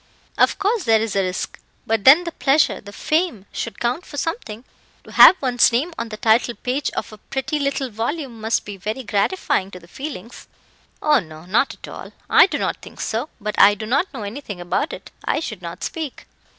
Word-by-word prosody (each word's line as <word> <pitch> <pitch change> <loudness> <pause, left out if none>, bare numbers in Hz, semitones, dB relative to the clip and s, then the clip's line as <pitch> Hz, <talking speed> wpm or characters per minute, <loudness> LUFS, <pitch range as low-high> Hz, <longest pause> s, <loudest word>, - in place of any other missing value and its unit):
"Of - - +3
course, 410 +1 0
there 225 -1 +5
is 220 -2 -2
a 195 - +3
risk; 185 0 -3 0.3
but 220 -2 0
then 295 +7 +8
the 340 - -4
pleasure, 290 0 +2
the 205 - -11
fame, 310 - -1
should 230 - -5
count 245 +8 -1
for 290 - -10
something. 265 - -4 0.4
To - - -14
have 370 - +9
one's 245 -3 +3
name 280 +9 0
on 230 - -4
the 215 - -7
title 230 +2 +2
page 260 +3 -2
of - - -4
a 215 - -12
pretty 270 +7 -3
little 275 -2 -1
volume 235 +2 -4
must 220 +1 0
be 205 -1 -7
very 215 +7 -4
gratifying 205 - 0
to 180 - -10
the 170 - -18
feelings." 250 - -8 0.6
"Oh 300 -2 +5
no, 160 -4 -11
not 215 +9 +1
at - - -12
all. - - -9 0.2
I - - +8
do - - -2
not - - -2
think - - -13
so; 235 +7 -2
but 210 0 -3
I 205 - +7
do 215 +1 -6
not 275 - +1
know 255 -7 -6
anything 205 -2 -6
about 175 - -1
it. - - -9
I - - 0
should 215 - -6
not 170 -1 -7
speak." 315 -5 -5
235 Hz, 210 wpm, -21 LUFS, 210-290 Hz, 0.6 s, have